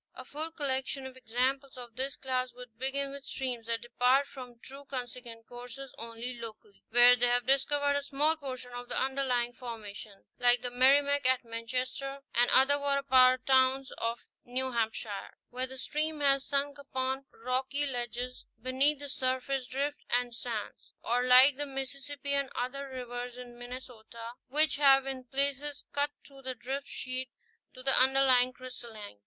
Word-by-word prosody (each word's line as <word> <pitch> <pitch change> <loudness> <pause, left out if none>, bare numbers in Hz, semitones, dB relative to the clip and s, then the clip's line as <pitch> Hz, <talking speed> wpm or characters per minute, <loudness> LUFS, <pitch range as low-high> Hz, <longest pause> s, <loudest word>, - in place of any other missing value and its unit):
A 255 - -9
full 310 +5 -4
collection 270 -3 -2
of 260 -1 -8
examples 260 +3 -1
of 240 -2 -9
this 265 +2 -2
class 255 -1 -1
should 245 -2 -12
begin 275 +1 -1
with 280 0 -8
streams 250 -4 -4
that 230 0 -1
depart 250 +3 +3
from 250 -3 -10
true 275 +4 -10
consequent 245 -3 -7
courses 245 +2 -9
only 235 +2 -5
locally, 215 -3 -10
where 245 +1 +8
they 245 0 +3
have 245 0 +2
discovered 285 +2 +2
a 285 - +1
small 290 +3 +2
portion 255 -4 -7
of 245 0 -7
the 245 - 0
underlying 260 -2 0
formation, 215 -4 -8
like 245 0 +4
the 245 - -3
Merrimack 280 +2 +4
at 260 0 +3
Manchester 255 +4 -4
and 240 +1 +4
other 280 +2 +5
water 280 0 +1
power 255 -1 +6
towns 260 +1 +3
of 230 +1 -2 0.2
New 260 +1 -2
Hampshire, 220 -3 -3
where 255 +1 -2
the 265 +1 -8
stream 305 +4 -2
has 275 -1 +4
sunk 285 0 0
upon 265 -1 -3
rocky 260 +4 -1
ledges 245 -1 -3
beneath 260 +5 +2
the 285 +1 -6
surface 260 -1 -1
drift 285 +3 -2
and 245 0 +1
sands; 230 -3 -5
or 245 +2 +1
like 255 +2 +8
the 290 0 -3
Mississippi 275 +1 -4
and 280 -1 +1
other 275 +3 -3
rivers 245 -1 -6
in 245 -1 -10
Minnesota 245 -2 -8 0.2
which 295 +2 +4
have 270 -2 +6
in 265 -1 -4
places 280 +2 -1
cut 285 +1 +2 0.2
through 275 -1 -15
the 260 -1 -4
drift 270 +4 -4
sheet 255 0 -4 0.5
to 255 - -10
the 270 0 +4
underlying 260 -1 +5
crystallines. 235 - -9
255 Hz, 165 wpm, -31 LUFS, 245-275 Hz, 0.5 s, where